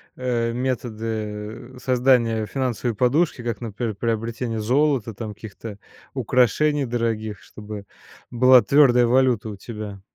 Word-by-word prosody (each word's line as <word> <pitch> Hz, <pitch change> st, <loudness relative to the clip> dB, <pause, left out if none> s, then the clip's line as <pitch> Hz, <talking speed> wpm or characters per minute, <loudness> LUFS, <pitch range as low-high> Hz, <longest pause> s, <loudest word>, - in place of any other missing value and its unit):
э, 120 Hz, -2 st, -1 dB
методы 115 Hz, -2 st, -4 dB
создания 125 Hz, -4 st, +2 dB
финансовой 125 Hz, -1 st, -2 dB
подушки, 130 Hz, +3 st, +1 dB
как, 115 Hz, -3 st, -3 dB
например, 115 Hz, 0 st, -4 dB
приобретение 115 Hz, +1 st, -2 dB
золота, 130 Hz, -1 st, +1 dB
там 105 Hz, +1 st, -6 dB
каких-то 105 Hz, 0 st, -10 dB, 0.3 s
украшений 135 Hz, +4 st, +2 dB
дорогих, 115 Hz, -3 st, -2 dB
чтобы 105 Hz, -1 st, -9 dB, 0.5 s
была 125 Hz, +1 st, +6 dB
твердая 125 Hz, +1 st, +5 dB
валюта 125 Hz, -2 st, +2 dB
у 105 Hz, -, -7 dB
тебя? 105 Hz, -2 st, -8 dB
115 Hz, 110 wpm, -23 LUFS, 110-125 Hz, 0.5 s, была